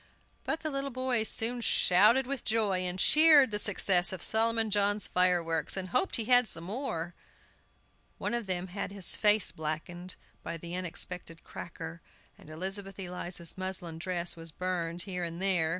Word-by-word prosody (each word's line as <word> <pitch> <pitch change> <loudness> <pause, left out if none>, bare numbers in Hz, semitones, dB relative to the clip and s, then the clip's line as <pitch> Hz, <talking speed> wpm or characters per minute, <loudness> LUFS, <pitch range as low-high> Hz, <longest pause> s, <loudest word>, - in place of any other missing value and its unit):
But 320 - -2
the 310 - -3
little 275 0 -2
boys 255 -3 -1
soon 240 +2 -1
shouted 215 +5 +4
with 270 -1 -4
joy, 215 -4 +1
and 180 0 -1
cheered 300 +1 +6
the 210 - 0
success 185 -3 +2
of 185 -3 -6
Solomon 225 0 +1
John's 205 -2 +2
fireworks, 175 -2 +1
and 185 -1 -3
hoped 380 - +1
he 230 - -1
had 245 0 +5
some 165 -3 0
more. 175 -5 -4 1.0
One - - -3
of 235 -3 -3
them 185 0 -2
had 195 +1 -5
his 195 -3 +2
face 210 -2 +3
blackened 165 +4 -5 0.3
by 165 - -6
an 170 +1 -8
unexpected 180 -1 -3
cracker, 165 0 -9 0.3
and - - -17
Elizabeth 195 +4 -5
Eliza's 175 -2 -3
muslin 185 -3 -4
dress 175 -1 0
was 165 -1 -8
burned 175 0 -3
here 180 -3 -4
and 170 0 -5
there. 185 -4 +2
185 Hz, 165 wpm, -30 LUFS, 175-220 Hz, 1.0 s, cheered